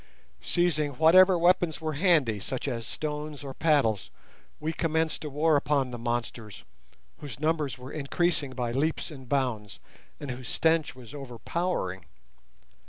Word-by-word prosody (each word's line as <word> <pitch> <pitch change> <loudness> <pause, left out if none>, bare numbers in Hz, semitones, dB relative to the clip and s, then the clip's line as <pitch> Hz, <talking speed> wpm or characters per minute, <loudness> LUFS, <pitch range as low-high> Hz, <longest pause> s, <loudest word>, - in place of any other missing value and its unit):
Seizing 155 -4 +1
whatever 180 +6 +6
weapons 175 -2 +3
were 160 -1 -3
handy, 150 - +3
such 130 +7 -4
as 115 -4 -3
stones 150 0 -5
or 135 -1 -6
paddles, 135 - +2 0.5
we 155 +2 -2
commenced 160 -1 0
a 150 - -4
war 150 +2 +2
upon 140 -2 +1
the 120 - -6
monsters—whose 115 - -7
numbers 155 -3 0
were 130 +2 -9
increasing 150 -1 -1
by 120 -2 -2
leaps 155 +6 -1
and 135 -4 -11
bounds, 125 -7 -1 0.4
and 145 -3 -5
whose 125 0 -7
stench 160 -3 +1
was 125 0 -12
overpowering. 130 - -3
145 Hz, 135 wpm, -28 LUFS, 125-160 Hz, 0.5 s, whatever